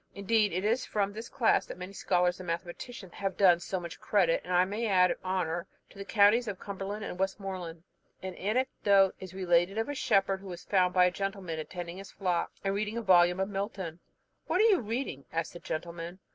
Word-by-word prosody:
Indeed, 205 Hz, +1 st, +2 dB
it 185 Hz, +4 st, -2 dB
is 235 Hz, +4 st, +2 dB
from 205 Hz, -1 st, -1 dB
this 225 Hz, +2 st, -7 dB
class 235 Hz, -4 st, +2 dB
that -, -, -7 dB
many 180 Hz, +2 st, -8 dB
scholars 180 Hz, -2 st, +1 dB
and 185 Hz, -, -8 dB
mathematicians 175 Hz, +4 st, -6 dB
have 195 Hz, -1 st, -3 dB
done 180 Hz, -4 st, +6 dB
so 185 Hz, +2 st, -3 dB
much 170 Hz, -1 st, -8 dB
credit, 180 Hz, -5 st, +2 dB
and 180 Hz, -, -7 dB
I 180 Hz, 0 st, +4 dB
may 210 Hz, +4 st, -2 dB
add 180 Hz, -3 st, +4 dB
honour, 180 Hz, -2 st, -1 dB, 0.2 s
to -, -, -17 dB
the -, -, -4 dB
counties 215 Hz, +4 st, +4 dB
of 200 Hz, -3 st, -3 dB
Cumberland 200 Hz, +1 st, -5 dB
and 180 Hz, -, -6 dB
Westmoreland. 190 Hz, -4 st, -3 dB, 0.4 s
An 190 Hz, -1 st, -4 dB
anecdote 200 Hz, -2 st, +2 dB
is 185 Hz, -1 st, -9 dB
related 180 Hz, +1 st, +2 dB
of 225 Hz, +5 st, -1 dB
a -, -, -1 dB
shepherd, 195 Hz, -7 st, +2 dB
who 195 Hz, -, -11 dB
was 175 Hz, -1 st, -8 dB
found 185 Hz, -2 st, +2 dB
by 180 Hz, -1 st, +6 dB
a 180 Hz, -, +3 dB
gentleman 195 Hz, -4 st, -4 dB
attending 175 Hz, +2 st, -6 dB
his 195 Hz, 0 st, -9 dB
flock, 180 Hz, -3 st, -1 dB
and 195 Hz, 0 st, 0 dB
reading 210 Hz, +2 st, -2 dB
a 235 Hz, -, -2 dB
volume 180 Hz, -2 st, +5 dB
of 190 Hz, +1 st, 0 dB
Milton. 195 Hz, -4 st, -4 dB, 0.5 s
"What 345 Hz, +3 st, +1 dB
are -, -, +6 dB
you 380 Hz, -, +4 dB
reading?" 225 Hz, -, -4 dB
asked 165 Hz, -1 st, -2 dB
the 175 Hz, -, -9 dB
gentleman. 170 Hz, +2 st, -5 dB
190 Hz, 210 wpm, -30 LUFS, 175-205 Hz, 0.5 s, done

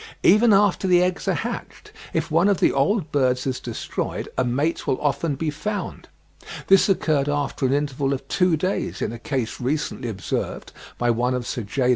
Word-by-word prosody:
Even 215 Hz, +5 st, +6 dB
after 200 Hz, -1 st, +3 dB
the 180 Hz, -1 st, +5 dB
eggs 180 Hz, 0 st, -2 dB
are -, -, +2 dB
hatched, -, -, -6 dB, 0.2 s
if -, -, -2 dB
one 170 Hz, +6 st, +4 dB
of 195 Hz, -5 st, +2 dB
the -, -, +4 dB
old 155 Hz, +4 st, +1 dB
birds 130 Hz, -3 st, +1 dB
is 130 Hz, -2 st, -2 dB
destroyed 120 Hz, -3 st, -4 dB
a 130 Hz, -, +1 dB
mate 140 Hz, +7 st, -1 dB
will 130 Hz, -, +1 dB
often 145 Hz, +1 st, 0 dB
be 155 Hz, +2 st, -2 dB
found; 205 Hz, +7 st, -5 dB, 0.6 s
this 195 Hz, +1 st, +5 dB
occurred 150 Hz, -7 st, +1 dB
after 145 Hz, -2 st, -1 dB
an 130 Hz, -, +1 dB
interval 140 Hz, -1 st, 0 dB
of 135 Hz, -, -3 dB
two 180 Hz, -4 st, +2 dB
days, 185 Hz, +6 st, -2 dB
in -, -, -2 dB
a 120 Hz, -, -8 dB
case 130 Hz, -5 st, -3 dB
recently 130 Hz, -2 st, -2 dB
observed 95 Hz, -4 st, -4 dB, 0.3 s
by 120 Hz, 0 st, +2 dB
one 125 Hz, +2 st, 0 dB
of 125 Hz, -1 st, -3 dB
Sir 120 Hz, -, -3 dB
J. 125 Hz, +5 st, -1 dB
145 Hz, 190 wpm, -23 LUFS, 125-180 Hz, 0.6 s, Even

